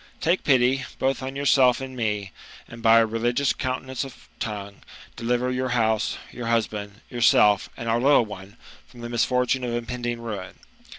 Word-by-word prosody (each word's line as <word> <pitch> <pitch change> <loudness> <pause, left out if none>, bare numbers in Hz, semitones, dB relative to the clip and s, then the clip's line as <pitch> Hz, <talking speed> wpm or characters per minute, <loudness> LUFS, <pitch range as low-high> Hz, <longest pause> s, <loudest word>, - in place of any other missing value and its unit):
Take 175 +3 +1
pity, 130 -1 +3
both 135 +1 0
on 130 +1 -5
yourself 135 -3 +4
and 130 -1 -7
me; 105 -4 -2 0.4
and 115 0 -11
by 115 0 +6
a 115 - +5
religious 120 +5 0
continence 130 0 -3
of 135 - -12
tongue, 100 -3 -5 0.4
deliver 125 +2 0
your 130 0 -1
house, 110 -2 +1
your 120 -2 -6
husband, 105 -3 -2
yourself, 110 -4 +4
and 115 - -6
our 115 +1 +1
little 140 -3 +5
one, 100 0 -10 0.3
from 120 - -14
the 120 - -6
misfortune 125 +2 +1
of 120 -1 -2
impending 120 0 -3
ruin. 105 -5 -6
120 Hz, 165 wpm, -24 LUFS, 110-130 Hz, 0.4 s, by